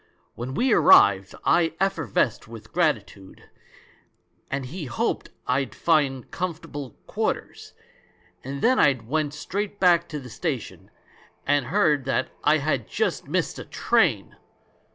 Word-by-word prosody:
When 125 +3 -6
we 255 -1 +2
arrived 100 - +5
I 165 -2 +3
effervesced 165 - 0
with 110 -1 -12
gratitude, 110 - -2 1.0
and 135 -1 -3
he 155 +5 -6
hoped 120 -2 -2 0.2
I'd 130 +2 -1
find 140 -6 +1
comfortable 155 -7 -5
quarters; - - -4 0.7
and 135 +1 -6
then 255 +2 +4
I 140 - +5
went 150 +3 -1
straight 200 +6 -4
back 175 -2 +4
to 150 - -5
the 125 -3 -11
station - - -5 0.3
— - - -30
and 145 -2 +1
heard 155 -9 +2
that 130 0 0
I 155 +1 +4
had 140 -6 -1
just - - -2
missed - - -1
a - - -6
train! - - +1
145 Hz, 130 wpm, -24 LUFS, 125-170 Hz, 1.0 s, arrived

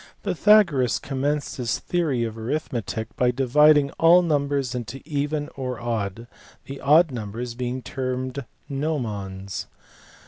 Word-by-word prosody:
Pythagoras 175 - +4
commenced 140 +2 -2
his 120 -3 -1
theory 155 -9 -1
of 115 -1 -4
arithmetic 115 -3 -4
by 125 - +2
dividing 140 +3 +4
11 170 +2 +6
numbers 140 -4 0
into 125 +2 -5
even 145 0 -2
or 125 -3 -4
odd: 115 -2 -3 0.4
the 135 0 -8
odd 155 +4 +5
numbers 115 +1 -5
being 125 +1 -4
termed 130 +1 -3 0.2
nomons. 105 -10 -4
130 Hz, 115 wpm, -24 LUFS, 120-145 Hz, 0.4 s, 11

